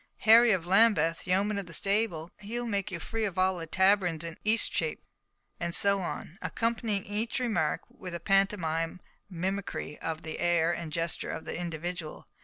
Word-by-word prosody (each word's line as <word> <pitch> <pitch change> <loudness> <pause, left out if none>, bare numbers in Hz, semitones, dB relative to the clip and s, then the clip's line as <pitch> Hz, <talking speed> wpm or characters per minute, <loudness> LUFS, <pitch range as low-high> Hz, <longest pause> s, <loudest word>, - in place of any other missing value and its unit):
Harry 230 +2 +7
of 185 -5 +1
Lambeth, 185 -5 +3
yeoman 200 +3 +1
of 195 - -6
the 165 - -6
stable. 195 -5 0
He 215 +4 -4
will 240 - -3
make 200 -4 -1
you 175 - -4
free 225 +6 -3
of 195 -4 -2
all 185 -1 +2
the 165 - -6
taverns 190 -2 +2
in 165 -1 -5
Eastchepe." 225 - +1 0.6
And 170 -1 -2
so 200 -1 +2
on, 175 +1 -6
accompanying 230 -3 -1
each 215 +5 -2
remark 205 -12 0
with 180 -2 -8
a - - -4
pantomime 180 -4 +1 0.3
mimicry 185 -4 -3
of 160 -1 -4
the 160 - -6
air 170 -1 +2
and 170 -2 -5
gesture 165 +1 -1
of - - -5
the - - -4
individual. 170 -1 -5
185 Hz, 175 wpm, -29 LUFS, 165-205 Hz, 0.6 s, Harry